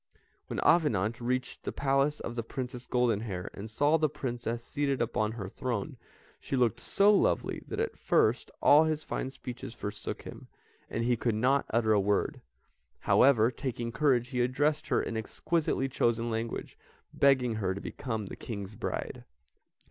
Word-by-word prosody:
When -, -, -3 dB
Avenant 115 Hz, -, +3 dB
reached 125 Hz, +1 st, -2 dB
the -, -, -3 dB
Palace 140 Hz, +2 st, +1 dB
of 115 Hz, -, -4 dB
the 120 Hz, -, -2 dB
Princess 125 Hz, +1 st, -6 dB
Goldenhair, 110 Hz, -6 st, 0 dB
and 105 Hz, +3 st, -7 dB
saw 145 Hz, +8 st, +3 dB
the 155 Hz, -1 st, +2 dB
Princess 120 Hz, -4 st, -4 dB
seated 140 Hz, -1 st, -1 dB
upon 110 Hz, -2 st, 0 dB
her 105 Hz, -5 st, -5 dB
throne, 115 Hz, 0 st, -3 dB, 0.4 s
she -, -, -3 dB
looked 120 Hz, -2 st, +2 dB
so 200 Hz, +9 st, +4 dB
lovely 200 Hz, -, +1 dB
that -, -, -4 dB
at 455 Hz, 0 st, -2 dB
first -, -, +2 dB
all 150 Hz, +2 st, +7 dB
his 155 Hz, -1 st, -1 dB
fine 130 Hz, -, -3 dB
speeches 125 Hz, -3 st, -8 dB
forsook 105 Hz, 0 st, -5 dB
him, -, -, -10 dB, 0.4 s
and 115 Hz, -, -2 dB
he 120 Hz, +1 st, +2 dB
could 115 Hz, -1 st, 0 dB
not 130 Hz, +5 st, +2 dB
utter 110 Hz, -1 st, +2 dB
a 105 Hz, -, +4 dB
word; 100 Hz, +1 st, 0 dB, 0.6 s
however, 120 Hz, -3 st, +5 dB
taking 120 Hz, -2 st, -4 dB
courage, 125 Hz, -1 st, +2 dB
he 125 Hz, -3 st, 0 dB
addressed 145 Hz, +6 st, +1 dB
her 130 Hz, -, +2 dB
in 115 Hz, -, -4 dB
exquisitely 135 Hz, +5 st, -1 dB
chosen 120 Hz, -2 st, 0 dB
language, 115 Hz, +1 st, -4 dB, 0.3 s
begging 130 Hz, -4 st, +3 dB
her 95 Hz, -3 st, -1 dB
to -, -, -5 dB
become 110 Hz, -3 st, -4 dB
the -, -, -7 dB
King's 100 Hz, -2 st, -6 dB
bride. -, -, -4 dB
120 Hz, 165 wpm, -30 LUFS, 110-140 Hz, 0.6 s, all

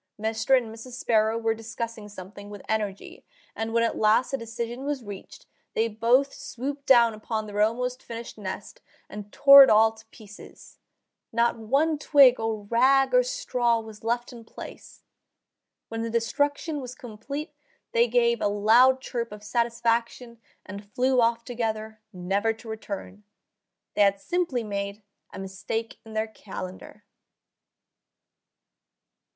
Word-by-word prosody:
Mr. 225 Hz, +4 st, +2 dB
and 230 Hz, -3 st, -4 dB
Mrs. 230 Hz, +3 st, -11 dB
Sparrow 220 Hz, -2 st, +1 dB
were 225 Hz, -1 st, 0 dB
discussing 225 Hz, -1 st, -6 dB
something 200 Hz, +1 st, -11 dB
with 205 Hz, -2 st, -10 dB
energy, 210 Hz, -3 st, -3 dB, 0.3 s
and 225 Hz, 0 st, -3 dB
when 230 Hz, 0 st, +2 dB
at 230 Hz, -, 0 dB
last 220 Hz, +5 st, +3 dB
a -, -, +1 dB
decision 235 Hz, +1 st, -5 dB
was 285 Hz, -3 st, -3 dB
reached 205 Hz, -2 st, -10 dB, 0.3 s
they 225 Hz, -, +2 dB
both 240 Hz, +5 st, +2 dB
swooped 280 Hz, +3 st, -6 dB
down 235 Hz, -3 st, +6 dB
upon 215 Hz, 0 st, -4 dB
their 205 Hz, 0 st, -2 dB
almost 250 Hz, +4 st, 0 dB
finished 230 Hz, 0 st, -8 dB
nest 195 Hz, -3 st, -7 dB, 0.3 s
and 210 Hz, 0 st, -9 dB
tore 280 Hz, 0 st, +9 dB
it 265 Hz, -, +4 dB
all 220 Hz, +1 st, +5 dB
to 220 Hz, 0 st, -17 dB
pieces. 210 Hz, -2 st, -15 dB, 0.5 s
Not 235 Hz, 0 st, +1 dB
one 285 Hz, +8 st, +1 dB
twig 275 Hz, -4 st, +6 dB
or 225 Hz, -2 st, -2 dB
rag 265 Hz, -, +3 dB
or -, -, +6 dB
straw 255 Hz, -, 0 dB
was 220 Hz, -1 st, -11 dB
left 240 Hz, +2 st, -2 dB
in 235 Hz, -1 st, -11 dB
place. -, -, -12 dB, 0.9 s
When 225 Hz, 0 st, -4 dB
the 230 Hz, -, -3 dB
destruction 285 Hz, +6 st, -1 dB
was 250 Hz, -1 st, -8 dB
complete 275 Hz, +4 st, -7 dB, 0.4 s
they 475 Hz, 0 st, +3 dB
gave 475 Hz, -1 st, +2 dB
a -, -, +2 dB
loud 230 Hz, +6 st, +4 dB
chirp 235 Hz, -3 st, -4 dB
of 210 Hz, 0 st, -10 dB
satisfaction 235 Hz, +1 st, -1 dB, 0.3 s
and 200 Hz, +2 st, -8 dB
flew 255 Hz, +2 st, +2 dB
off 230 Hz, 0 st, +1 dB
together, 220 Hz, -3 st, -4 dB
never 195 Hz, +4 st, -1 dB
to 225 Hz, +1 st, -15 dB
return. 210 Hz, -2 st, -7 dB, 0.7 s
They -, -, +1 dB
had 200 Hz, -1 st, +4 dB
simply 330 Hz, -, -1 dB
made 200 Hz, 0 st, -5 dB, 0.3 s
a -, -, -9 dB
mistake 195 Hz, +4 st, -5 dB
in 220 Hz, -, -12 dB
their 220 Hz, 0 st, 0 dB
calendar. 200 Hz, -1 st, -9 dB
230 Hz, 145 wpm, -26 LUFS, 215-250 Hz, 0.9 s, tore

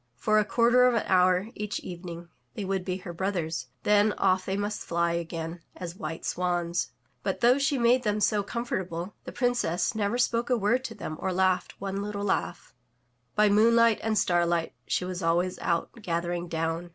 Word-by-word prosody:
For 215 Hz, -, +2 dB
a 210 Hz, -, +2 dB
quarter 240 Hz, +3 st, +4 dB
of 245 Hz, -, +2 dB
an 225 Hz, -, 0 dB
hour 185 Hz, +2 st, +3 dB
each 210 Hz, -2 st, -4 dB
evening 175 Hz, -1 st, -8 dB, 0.3 s
they 210 Hz, -, -4 dB
would 190 Hz, -1 st, -1 dB
be 185 Hz, 0 st, -2 dB
her 180 Hz, -2 st, -8 dB
brothers, 165 Hz, -7 st, -2 dB, 0.2 s
then 210 Hz, 0 st, +4 dB
off 185 Hz, -1 st, +1 dB
they 195 Hz, 0 st, -1 dB
must 205 Hz, +1 st, -2 dB
fly 170 Hz, 0 st, 0 dB
again 170 Hz, 0 st, -4 dB
as 175 Hz, -1 st, -6 dB
white 160 Hz, -2 st, -6 dB
swans. 175 Hz, -1 st, -1 dB, 0.3 s
But, -, -, -2 dB
though 245 Hz, +3 st, +5 dB
she 280 Hz, 0 st, +1 dB
made 245 Hz, +1 st, +4 dB
them 210 Hz, -2 st, 0 dB
so 210 Hz, 0 st, +2 dB
com 235 Hz, +4 st, -4 dB
fortable, 180 Hz, -3 st, -3 dB
the -, -, -6 dB
Princess 245 Hz, -9 st, 0 dB
never 215 Hz, +1 st, 0 dB
spoke 235 Hz, 0 st, +1 dB
a 250 Hz, -, +3 dB
word 230 Hz, +5 st, +1 dB
to 225 Hz, -, -6 dB
them 155 Hz, -, -6 dB
or 190 Hz, -, -1 dB
laughed 185 Hz, 0 st, +1 dB
one 195 Hz, 0 st, -3 dB
little 205 Hz, 0 st, -4 dB
laugh. 205 Hz, -, -2 dB, 0.6 s
By 210 Hz, 0 st, +5 dB
moonlight 230 Hz, +2 st, +5 dB
and 220 Hz, -1 st, 0 dB
starlight 175 Hz, -2 st, +1 dB
she 180 Hz, -, 0 dB
was 185 Hz, 0 st, -4 dB
always 175 Hz, +2 st, +1 dB
out 170 Hz, -1 st, -1 dB
gathering 175 Hz, -1 st, -2 dB
down. 165 Hz, +1 st, -2 dB
190 Hz, 190 wpm, -27 LUFS, 175-215 Hz, 0.6 s, though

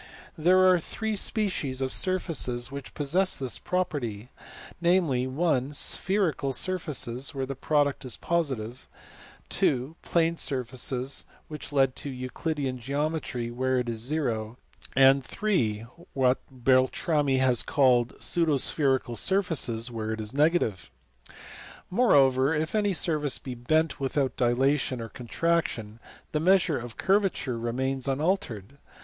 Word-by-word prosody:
There 185 Hz, +4 st, +4 dB
are 180 Hz, -1 st, +5 dB
three 220 Hz, +6 st, -3 dB
species 190 Hz, -, -1 dB
of 130 Hz, -1 st, -2 dB
surfaces 145 Hz, -10 st, -1 dB
which 140 Hz, -2 st, -8 dB
possess 175 Hz, +7 st, +1 dB
this 130 Hz, -3 st, -3 dB
property: 130 Hz, -, -3 dB, 0.5 s
namely, 170 Hz, -8 st, +2 dB
(i) 140 Hz, 0 st, +1 dB
spherical 165 Hz, -4 st, 0 dB
surfaces, 140 Hz, -5 st, -1 dB
where 135 Hz, -1 st, -2 dB
the 135 Hz, -, -4 dB
product 145 Hz, +1 st, 0 dB
is 125 Hz, -4 st, -6 dB
positive; 130 Hz, -8 st, -2 dB, 0.7 s
(ii) 130 Hz, +3 st, +1 dB
plane 165 Hz, 0 st, +1 dB
surfaces 130 Hz, -1 st, -2 dB, 0.2 s
(which 150 Hz, -1 st, -6 dB
lead 135 Hz, -2 st, +2 dB
to 145 Hz, -, -4 dB
Euclidean 130 Hz, +1 st, -3 dB
geometry), 140 Hz, -2 st, -2 dB
where 130 Hz, +2 st, 0 dB
it 125 Hz, -1 st, -1 dB
is 115 Hz, -1 st, -3 dB
zero; 120 Hz, -4 st, -2 dB, 0.4 s
and 135 Hz, +1 st, +6 dB, 0.2 s
(iii) 115 Hz, -, +1 dB, 0.3 s
what 130 Hz, -1 st, +2 dB
Beltrami 135 Hz, +3 st, +2 dB
has 130 Hz, -2 st, +3 dB
called 125 Hz, -4 st, +2 dB
pseudo 165 Hz, -4 st, +1 dB
spherical 130 Hz, -3 st, 0 dB
surfaces, 130 Hz, -, 0 dB
where 110 Hz, -1 st, -3 dB
it 110 Hz, -, -5 dB
is 110 Hz, +1 st, -4 dB
negative. 150 Hz, -, +1 dB, 1.0 s
Moreover, 140 Hz, -, +4 dB
if 155 Hz, +1 st, -2 dB
any 205 Hz, -2 st, +1 dB
surface 155 Hz, -5 st, +1 dB
be 130 Hz, -, -7 dB
bent 155 Hz, +6 st, 0 dB
without 135 Hz, 0 st, -1 dB
dilation 130 Hz, +2 st, +1 dB
or 115 Hz, 0 st, -6 dB
contraction, 120 Hz, -5 st, -2 dB, 0.3 s
the 150 Hz, -, 0 dB
measure 180 Hz, -2 st, +3 dB
of 120 Hz, -1 st, -8 dB
curvature 190 Hz, -, +1 dB
remains 130 Hz, +3 st, -2 dB
unaltered. 140 Hz, -, -2 dB
135 Hz, 125 wpm, -27 LUFS, 125-160 Hz, 1.0 s, and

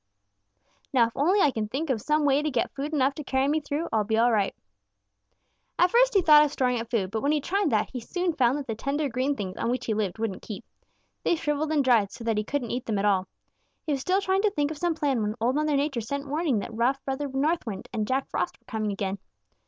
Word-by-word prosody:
'Now 245 Hz, -4 st, +5 dB
if 230 Hz, -, -5 dB
only 365 Hz, +8 st, +3 dB
I 295 Hz, -, +4 dB
can 220 Hz, -3 st, -3 dB
think 275 Hz, +6 st, -2 dB
of 225 Hz, -5 st, -1 dB
some 300 Hz, +3 st, +1 dB
way 280 Hz, 0 st, +3 dB
to 305 Hz, -, -1 dB
get 250 Hz, -5 st, -1 dB
food 285 Hz, +2 st, -4 dB
enough 275 Hz, -2 st, +2 dB
to 300 Hz, -, -7 dB
carry 265 Hz, 0 st, +1 dB
me 305 Hz, +2 st, +2 dB
through, 295 Hz, +2 st, -3 dB
I'll 220 Hz, -1 st, +3 dB
be 220 Hz, +2 st, 0 dB
all 240 Hz, +2 st, +4 dB
right.' 205 Hz, -3 st, +1 dB, 1.2 s
"At 355 Hz, +1 st, +4 dB
first -, -, +4 dB
he 385 Hz, -, +5 dB
thought 300 Hz, -2 st, +8 dB
of 295 Hz, -, 0 dB
storing 250 Hz, -4 st, 0 dB
up 230 Hz, -, -8 dB
food, 200 Hz, -6 st, -1 dB
but 220 Hz, 0 st, -2 dB
when 285 Hz, -, +1 dB
he 305 Hz, -, +2 dB
tried 390 Hz, +7 st, 0 dB
that, 215 Hz, -2 st, 0 dB
he 255 Hz, -, -4 dB
soon 355 Hz, +8 st, -2 dB
found 260 Hz, -2 st, +2 dB
that 285 Hz, -, -5 dB
the 230 Hz, -, -3 dB
tender 280 Hz, +6 st, -1 dB
green 260 Hz, +4 st, 0 dB
things 190 Hz, -6 st, -5 dB
on 230 Hz, -, -1 dB
which 250 Hz, +1 st, -1 dB
he 220 Hz, -, 0 dB
lived 205 Hz, -3 st, -2 dB
wouldn't 220 Hz, -4 st, -3 dB
keep. 210 Hz, -, -8 dB, 0.6 s
They -, -, +2 dB
shriveled 300 Hz, -1 st, -1 dB
and 300 Hz, -3 st, +2 dB
dried, 230 Hz, -6 st, +3 dB
so 235 Hz, -, -9 dB
that 225 Hz, -2 st, 0 dB
he -, -, -1 dB
couldn't 250 Hz, 0 st, -3 dB
eat 245 Hz, +1 st, -4 dB
them 215 Hz, -3 st, 0 dB
at 195 Hz, -, 0 dB
all. 190 Hz, -2 st, +2 dB, 0.6 s
He 310 Hz, -, -2 dB
was 275 Hz, -2 st, 0 dB
still 375 Hz, +7 st, +1 dB
trying 385 Hz, 0 st, +1 dB
to 425 Hz, -, +3 dB
think 295 Hz, -6 st, -1 dB
of 305 Hz, -, -7 dB
some 345 Hz, -2 st, 0 dB
plan 280 Hz, -6 st, 0 dB
when 210 Hz, 0 st, -1 dB
Old 240 Hz, +3 st, +1 dB
Mother 300 Hz, +1 st, +1 dB
Nature 275 Hz, -3 st, 0 dB
sent 280 Hz, +5 st, -4 dB
warning 295 Hz, -3 st, 0 dB
that 210 Hz, +3 st, -4 dB
rough 245 Hz, +4 st, 0 dB
Brother 275 Hz, +2 st, -2 dB
North 290 Hz, +5 st, 0 dB
Wind 195 Hz, -3 st, -5 dB
and 215 Hz, -2 st, -1 dB
Jack 265 Hz, +1 st, 0 dB
Frost -, -, -2 dB
were -, -, -39 dB
coming 215 Hz, -3 st, -2 dB
again. 195 Hz, 0 st, -3 dB
270 Hz, 260 wpm, -26 LUFS, 225-300 Hz, 1.2 s, thought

